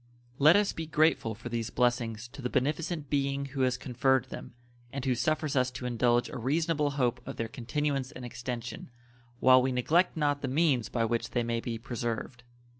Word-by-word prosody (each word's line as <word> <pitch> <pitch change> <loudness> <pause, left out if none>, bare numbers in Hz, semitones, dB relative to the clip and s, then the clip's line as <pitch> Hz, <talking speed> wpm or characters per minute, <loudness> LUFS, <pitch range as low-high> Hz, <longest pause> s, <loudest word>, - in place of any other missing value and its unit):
Let 155 +4 +7
us 205 0 +3
be 165 -1 -5
grateful 155 -8 +2
for 120 +2 -8
these 115 -1 -2
blessings 120 -1 0
to 135 - -10
the 125 - -2
beneficent 150 +3 -1
Being 140 -1 0
who 135 - -2
has 130 0 +2
conferred 130 0 +1
them, - - -8 0.4
and 140 -1 -4
who 130 - +2
suffers 150 +4 0
us 130 -1 +3
to 125 0 -7
indulge 120 0 +2
a - - -6
reasonable 150 +4 +1
hope 125 -2 +1
of - - -5
their 115 - -3
continuance 135 +3 -2
and 130 -4 -8
extension, 120 -1 -6 0.5
while 130 0 +7
we 130 +1 0
neglect 160 +9 +2
not 145 -2 +1
the 135 - -2
means 135 -5 +2
by 115 -2 0
which 115 +1 -1
they 120 - 0
may 115 0 -1
be 115 0 -4
preserved. 120 +1 -4
130 Hz, 190 wpm, -29 LUFS, 120-145 Hz, 0.5 s, Let